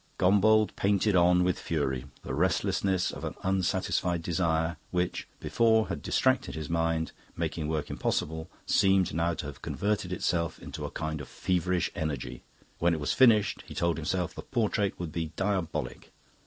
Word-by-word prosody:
Gombauld 105 +3 +4
painted 100 +1 +2
on 90 0 +5
with 90 0 +1
fury. 65 -5 -1 0.2
The - - -5
restlessness 95 +3 +1
of - - -8
an - - -4
unsatisfied 90 -2 0
desire, 80 -1 0
which, 90 0 -1
before, 110 -1 +2
had - - -3
distracted 130 0 +1
his 80 0 -5
mind, 80 -1 0 0.3
making 80 -3 -2
work 80 -2 -2
impossible, 80 +2 -2 0.2
seemed 95 -3 +3
now 85 +1 +1
to - - -5
have 75 -3 -8
converted 100 -3 -1
itself 85 -2 -1
into - - -7
a - - -4
kind 80 -1 -4
of - - -8
feverish 90 -1 0
energy. 75 -6 -4 0.4
When 85 0 +3
it - - -4
was 75 - 0
finished, 115 -5 +4
he - - -9
told 85 -2 +1
himself, 90 +3 -1
the - - -7
portrait 105 -5 -1
would 85 -3 -4
be 80 -1 -4
diabolic. 85 -9 -2
85 Hz, 160 wpm, -29 LUFS, 80-95 Hz, 0.4 s, on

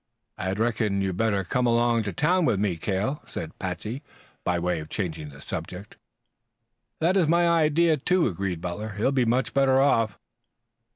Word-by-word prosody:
"I 95 - -3
reckon 110 -2 0
you'd 95 -2 -2
better 105 -3 +1
come 125 +6 0
along 120 0 +3
to 100 - -2
town 175 - +2
with 100 - +2
me, 100 -4 0
Cale," 100 - -2
said 80 -1 -7
Patsey, 95 - -4 0.4
by 90 - 0
way 85 -1 -1
of 75 0 -8
changing 80 -6 -4
the 70 0 -13
subject. 90 +4 -6 1.0
"That 170 +4 +2
is 180 -5 +3
my 170 +2 +3
idea, 165 0 +3
too," 180 +5 +2
agreed 95 -3 -3
Butler. 105 +5 -4
"He 105 - -3
will 135 - +3
be 130 -3 +2
much 125 +3 +1
better 135 -1 +4
off." 115 -7 +2
110 Hz, 175 wpm, -26 LUFS, 95-135 Hz, 1.0 s, better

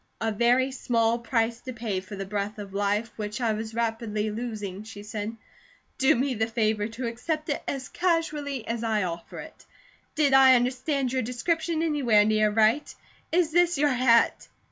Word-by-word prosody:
"A 225 0 0
very 245 +5 +2
small 235 -2 +1
price 230 -1 0
to 255 - -7
pay 220 -5 -3
for 190 +2 -9
the 195 0 -5
breath 205 +1 -3
of 200 -2 -8
life, 205 +3 0
which 210 +1 -4
I 230 -3 +1
was 220 +1 -5
rapidly 225 -2 -1
losing," 210 -4 -5
she 215 -1 -10
said. 215 +1 -5 0.6
"Do 265 - +4
me 260 +2 0
the 220 -1 0
favour 215 -2 0
to 230 +3 -6
accept 305 +7 -3
it 290 - -1
as 265 -2 -3
casually 300 -7 -1
as 230 0 -3
I 220 -3 +1
offer 170 -1 -6
it. - - -10 0.5
Did 295 -3 +2
I 265 -1 +8
understand 255 +2 0
your 260 - +1
description 320 +7 -1
anywhere 255 -10 +3
near 215 0 +3
right? 220 +7 +2 0.4
Is 335 -2 +2
this 345 -1 +3
your 295 +1 +3
hat?" 245 -3 +3
230 Hz, 175 wpm, -26 LUFS, 215-265 Hz, 0.6 s, I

